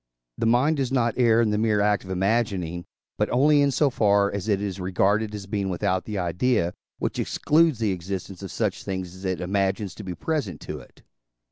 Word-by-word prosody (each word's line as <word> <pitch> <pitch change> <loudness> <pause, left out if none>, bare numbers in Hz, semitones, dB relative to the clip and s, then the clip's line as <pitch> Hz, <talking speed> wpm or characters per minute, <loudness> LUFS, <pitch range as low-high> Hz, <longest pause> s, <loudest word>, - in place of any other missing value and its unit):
The 115 - +1
mind 130 +7 +3
does 135 -2 -1
not 120 -4 +2
err 115 -2 +4
in 110 -2 +2
the 105 - +1
mere 110 -2 +2
act 105 0 +2
of 95 - -12
imagining, 95 -3 0 0.3
but - - +1
only 145 +3 +4
in 140 - +4
so 140 +1 +2
far 100 -3 +3
as 100 +1 -4
it 100 -3 +2
is 100 -2 -4
regarded 100 +4 +1
as 100 -2 -7
being 100 -1 -2
without 95 0 -1
the 105 -2 -4
idea, 90 +1 +1 0.2
which - - -3
excludes 160 -2 +2
the 110 -3 0
existence 95 +1 -5
of 95 - -6
such 105 -4 -2
things 95 -2 -4
as 95 +1 -10
it 95 -2 -1
imagines 95 +2 -1
to 105 - -9
be 90 -2 -5
present 120 - -2
to 75 - -6
it. - - -18
100 Hz, 210 wpm, -25 LUFS, 95-115 Hz, 0.3 s, err